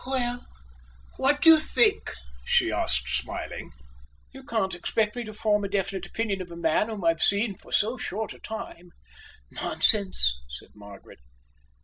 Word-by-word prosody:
"Well, 245 -2 -2 0.7
what 285 +2 +2
do 325 - +9
you 320 - +7
think?" 420 +7 +2 0.3
she - - +2
asked, 60 -1 0
smiling. 65 - -4 0.6
"You 270 0 -11
can't 220 -9 -1
expect 210 +5 -1
me 245 - -4
to 215 - -7
form 210 -1 +1
a 200 - -3
definite 195 -2 -2
opinion 200 -1 -2
of 180 - -8
a 170 - -9
man 170 +6 +1
whom 210 -4 -6
I've 165 -1 +2
seen 200 +1 +2
for - - -18
so 225 +5 +1
short 220 -1 -4
a - - -16
time." 180 -5 -8 0.6
"Nonsense!" 185 - +3
said - - -10
Margaret. 100 -7 -14
205 Hz, 155 wpm, -26 LUFS, 175-235 Hz, 0.7 s, do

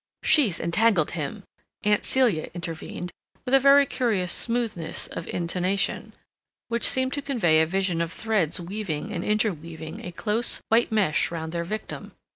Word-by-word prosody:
"She 295 -9 +4
entangled 175 -1 +2
him," 165 +5 -4 0.4
Aunt 210 0 +2
Celia 240 -12 +2
intervened, 175 +1 -6 0.3
with 255 - -3
a 270 - +8
very 280 +1 +6
curious 220 -10 0
smoothness 230 -9 -1
of - - -7
intonation, 180 +3 -1 0.6
which 235 0 +4
seemed 260 +1 +2
to 285 - -1
convey 175 - +2
a 160 - +2
vision 185 -1 0
of 165 -1 -2
threads 205 -9 0
weaving 185 0 -4
and 175 -5 -3
interweaving 165 -7 -2
a 180 - -6
close, 215 +6 0
white 230 +1 +3
mesh 200 -8 +2
round 160 -1 -5
their 170 0 -2
victim. 215 +5 -6
195 Hz, 150 wpm, -25 LUFS, 170-230 Hz, 0.6 s, a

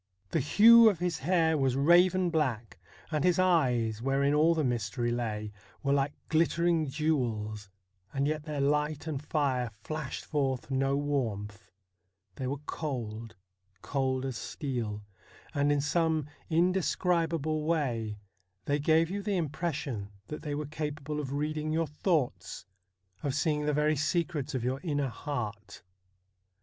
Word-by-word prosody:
The 165 - +2
hue 225 - +8
of 200 - -1
his 175 -2 -2
hair 160 +1 +2
was 135 -2 +2
raven 175 +5 +4
black, 130 -9 -1 0.3
and 150 -2 0
his 180 -1 +3
eyes, 125 -12 +2
wherein 135 +2 +2
all 160 +3 +4
the 155 - +1
mystery 120 -1 -1
lay, 110 -3 -3 0.3
were 140 0 +2
like 140 +1 +1
glittering 165 0 +2
jewels, 115 -9 -1 0.4
and 140 +1 0
yet 155 0 -1
their 150 -3 -3
light 150 +2 0
and 150 -3 -4
fire 135 -5 0
flashed 155 -4 -5
forth 135 -3 -1
no 135 +1 +1
warmth; 105 -9 -3 0.7
they 130 - -3
were 140 +3 -2
cold 115 -7 -5 0.3
— 95 0 -41
cold 130 -1 -1
as 130 -4 -3
steel, 115 -6 -4 0.5
and 145 0 +2
in 145 -1 +2
some 160 0 +1 0.2
indescribable 165 -3 +1
way 120 -10 -1 0.5
they 145 +1 +1
gave 160 +3 +3
you 200 +1 -2
the 200 -1 -1
impression 145 - -3 0.2
that 150 - -5
they 150 -2 -3
were 150 +1 -3
capable 150 0 -4
of 135 -3 -4
reading 155 +2 -2
your 165 +1 +1
thoughts, 150 - -1 0.6
of 140 -2 -2
seeing 150 -1 0
the - - +3
very 150 +1 +2
secrets 155 -2 -1
of 125 - -2
your 130 +2 -1
inner 145 -6 -1
heart. 105 -7 -5
145 Hz, 145 wpm, -30 LUFS, 125-160 Hz, 0.7 s, hue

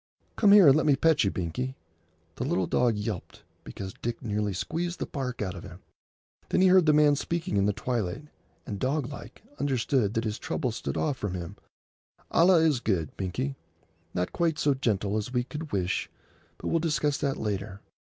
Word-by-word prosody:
Come 205 -3 +5
here 200 -5 +9
and 135 - +8
let 155 - +2
me 145 - +5
pet 160 0 +3
you, 100 - +2
Binkie." 95 +10 -3 0.6
The - - -2
little 95 - 0
dog 120 +4 +2
yelped 105 - -5 0.2
because 95 -1 -7
Dick 115 0 -3
nearly 105 -2 -1
squeezed 170 - -3
the - - -3
bark 125 -6 -4
out 95 -3 -3
of 90 - -9
him. - - -11 0.7
Then - - +2
he 190 - +6
heard 180 -3 +5
the - - +7
man 150 -1 +5
speaking 170 +4 -2
in 100 0 +3
the - - +3
twilight, 110 +2 -3 0.4
and, 100 -2 -5
doglike, 140 - -3 0.2
understood 130 -5 +1
that 115 - +1
his 110 -2 -3
trouble 160 -5 -2
stood 110 - -4
off 145 -4 0
from 100 -5 -3
him—"Allah 165 - -1
is 155 -6 +3
good, 90 -10 -1
Binkie. 130 +9 -3 0.6
Not 90 0 -1
quite 165 -3 +1
so 145 - +2
gentle 105 -6 0
as 110 +3 -3
we 125 -1 +1
could 150 +4 -7
wish, 95 -1 -1 0.5
but - - -4
we'll 165 - +2
discuss 150 -3 0
that 140 -2 -1
later. 100 -1 -4
125 Hz, 185 wpm, -28 LUFS, 100-150 Hz, 0.7 s, here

